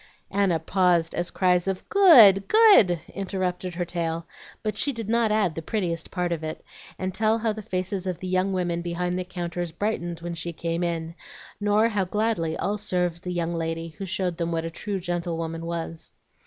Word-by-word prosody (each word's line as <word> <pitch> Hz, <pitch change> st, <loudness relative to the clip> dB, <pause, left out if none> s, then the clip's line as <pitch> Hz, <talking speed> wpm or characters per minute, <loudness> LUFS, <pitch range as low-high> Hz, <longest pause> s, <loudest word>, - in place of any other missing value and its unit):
Anna 195 Hz, -4 st, +2 dB
paused 175 Hz, 0 st, +2 dB
as 175 Hz, 0 st, -1 dB
cries 180 Hz, -1 st, +2 dB
of 190 Hz, -1 st, -3 dB
"Good! 250 Hz, -, +7 dB
good!" 405 Hz, -, +6 dB
interrupted 185 Hz, -2 st, -3 dB
her 175 Hz, 0 st, -2 dB
tale; 165 Hz, -1 st, -3 dB, 0.4 s
but 215 Hz, -2 st, -2 dB
she 280 Hz, +7 st, +1 dB
did 230 Hz, -5 st, -5 dB
not 230 Hz, -1 st, +2 dB
add 210 Hz, -6 st, +2 dB
the 165 Hz, -, -5 dB
prettiest 170 Hz, -3 st, -2 dB
part 180 Hz, -2 st, -2 dB
of 165 Hz, -2 st, -2 dB
it, 155 Hz, 0 st, -6 dB, 0.3 s
and 185 Hz, 0 st, -3 dB
tell 220 Hz, +2 st, +2 dB
how 225 Hz, -1 st, 0 dB
the 215 Hz, -, -7 dB
faces 190 Hz, 0 st, -3 dB
of 180 Hz, -2 st, -2 dB
the 185 Hz, -, -6 dB
young 185 Hz, +1 st, +1 dB
women 175 Hz, -2 st, -1 dB
behind 175 Hz, +1 st, -2 dB
the -, -, -1 dB
counters 175 Hz, -1 st, -4 dB
brightened 175 Hz, -2 st, -3 dB
when 175 Hz, 0 st, -4 dB
she 170 Hz, +1 st, -4 dB
came 165 Hz, +1 st, -3 dB
in, 165 Hz, -1 st, -2 dB, 0.5 s
nor 210 Hz, +2 st, +3 dB
how 205 Hz, -4 st, 0 dB
gladly 185 Hz, -5 st, -1 dB
all 205 Hz, +1 st, -2 dB
served 180 Hz, -4 st, -1 dB
the 180 Hz, -, -5 dB
young 170 Hz, -1 st, -1 dB
lady 165 Hz, 0 st, -3 dB
who 165 Hz, +5 st, -8 dB
showed 180 Hz, -2 st, -2 dB
them 170 Hz, -1 st, -2 dB
what 165 Hz, 0 st, -1 dB
a 165 Hz, -, -4 dB
true 200 Hz, +3 st, -4 dB
gentlewoman 165 Hz, -2 st, -3 dB
was. 165 Hz, -1 st, -5 dB
180 Hz, 195 wpm, -25 LUFS, 170-200 Hz, 0.5 s, Good